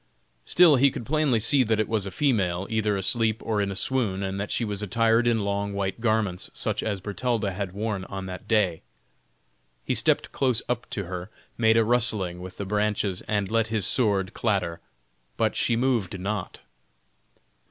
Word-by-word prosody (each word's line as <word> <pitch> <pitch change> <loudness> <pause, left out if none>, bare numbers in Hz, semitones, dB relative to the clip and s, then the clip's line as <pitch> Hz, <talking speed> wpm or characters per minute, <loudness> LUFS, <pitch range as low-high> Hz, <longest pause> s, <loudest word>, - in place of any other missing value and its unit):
Still 170 -5 +6
he 140 +2 +5
could 120 - -7
plainly 150 -3 +1
see 130 +5 +4
that 110 -2 0
it 110 - +1
was 110 -3 -1
a - - -3
female, 95 - 0
either 105 -2 0
asleep 110 +3 +1
or 110 -2 0
in 100 - -1
a 95 - -4
swoon, 100 -3 0
and 95 0 -3
that 100 - -4
she 120 - 0
was 105 -1 -3
attired 115 +3 +2
in 115 -2 +2
long 100 0 -2
white 95 0 -3
garments, 110 -6 0
such - - -1
as 105 -3 -2
Bertalda 105 +2 -2
had 95 -1 -5
worn 100 -2 -3
on 95 0 -6
that 90 -1 -8
day. 100 -7 +1 1.0
He - - 0
stepped - - +1
close 130 -4 +2
up 125 0 -3
to 100 - -3
her, 90 +1 -6 0.3
made 110 -1 +3
a 115 - +5
rustling 110 -7 +3
with 95 0 -9
the 100 - -4
branches, 105 -2 -1
and 100 -2 -1
let 115 -1 +2
his 110 -3 -1
sword 100 -4 +1
clatter, 95 -7 -1 0.6
but - - +1
she 120 - +1
moved 115 -7 0
not. 100 0 -4
105 Hz, 185 wpm, -25 LUFS, 95-115 Hz, 1.0 s, Still